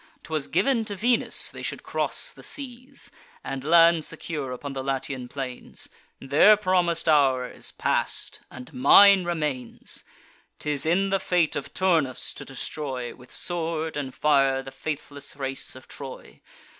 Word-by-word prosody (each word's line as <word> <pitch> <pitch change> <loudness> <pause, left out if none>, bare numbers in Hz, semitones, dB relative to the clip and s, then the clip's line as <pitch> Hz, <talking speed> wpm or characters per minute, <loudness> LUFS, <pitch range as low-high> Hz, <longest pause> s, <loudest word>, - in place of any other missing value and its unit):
'Twas 155 -3 -2
giv'n 260 -4 +2
to 205 -2 -5
Venus 235 +5 +2
they - - -9
should - - -4
cross - - -1
the - - -14
seas, 265 -1 -7 0.3
And 135 -1 -5
land 165 +1 +6
secure 145 -5 -5
upon 135 +2 -6
the 135 -1 -4
Latian 135 -1 -3
plains: 130 -1 -5 0.3
Their 150 +10 +6
promis'd 180 -5 +1
hour 135 -5 +4
is - - -8
pass'd, - - -1
and 125 -1 -11
mine 190 +8 +7
remains. 150 -8 -3 0.5
'Tis 150 0 -1
in 195 +4 +2
the 195 - +2
fate 175 -4 +1
of - - -4
Turnus 165 -9 +1
to - - -8
destroy, 135 -2 -4
With 125 0 -16
sword 165 -2 -1
and 140 -3 -3
fire, 135 -3 +3
the 135 - -9
faithless 140 0 -5
race 135 -2 -4
of 130 - -13
Troy. 135 -2 -10
150 Hz, 145 wpm, -26 LUFS, 135-175 Hz, 0.5 s, mine